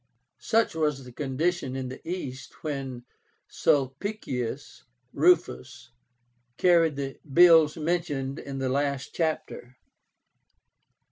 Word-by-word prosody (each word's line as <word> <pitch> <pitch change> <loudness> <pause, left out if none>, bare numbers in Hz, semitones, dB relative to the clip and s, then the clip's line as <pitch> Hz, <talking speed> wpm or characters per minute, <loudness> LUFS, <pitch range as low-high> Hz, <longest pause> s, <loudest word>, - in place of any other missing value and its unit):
Such 225 -2 +1
was 150 -4 -1
the 125 - -11
condition 135 +2 -2
in 130 -1 -4
the 130 - -9
East 135 -8 -6
when 135 -5 -5 0.4
Sulpicius 135 - -2 0.3
Rufus 130 - +1 0.7
carried 170 -4 +4
the 135 -1 -5
bills 165 -1 +6
mentioned 150 -5 -2
in 140 -1 -7
the 135 -1 -1
last 140 0 -1
chapter. 155 -6 -3
140 Hz, 95 wpm, -27 LUFS, 130-165 Hz, 0.7 s, bills